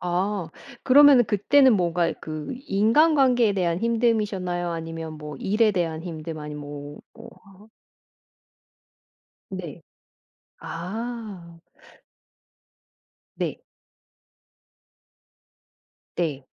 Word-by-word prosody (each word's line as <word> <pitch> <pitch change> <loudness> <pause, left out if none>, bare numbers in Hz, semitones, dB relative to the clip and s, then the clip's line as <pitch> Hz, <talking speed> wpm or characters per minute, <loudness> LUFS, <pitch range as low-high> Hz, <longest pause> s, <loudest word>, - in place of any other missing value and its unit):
아. 180 0 -2 0.3
그러면은 275 -2 +7
그때는 250 +7 +4
뭔가 175 -2 +1
그 155 -1 -6 0.2
인간관계에 245 +2 +3
대한 175 -3 0
힘듦이셨나요? 210 -7 0
아니면 165 -1 -6
뭐 150 -1 -8
일에 215 - +2
대한 165 -4 -2
힘듦 160 -2 -6
아니면 150 0 -7
뭐 145 0 -9
어 230 0 -12 0.2
하 195 +2 -18 1.8
네. 175 -4 -7 0.8
아. 195 -2 -7 1.8
네. - - -3 2.6
네. 145 -6 -2
180 Hz, 160 characters per minute, -24 LUFS, 165-225 Hz, 2.6 s, 그러면은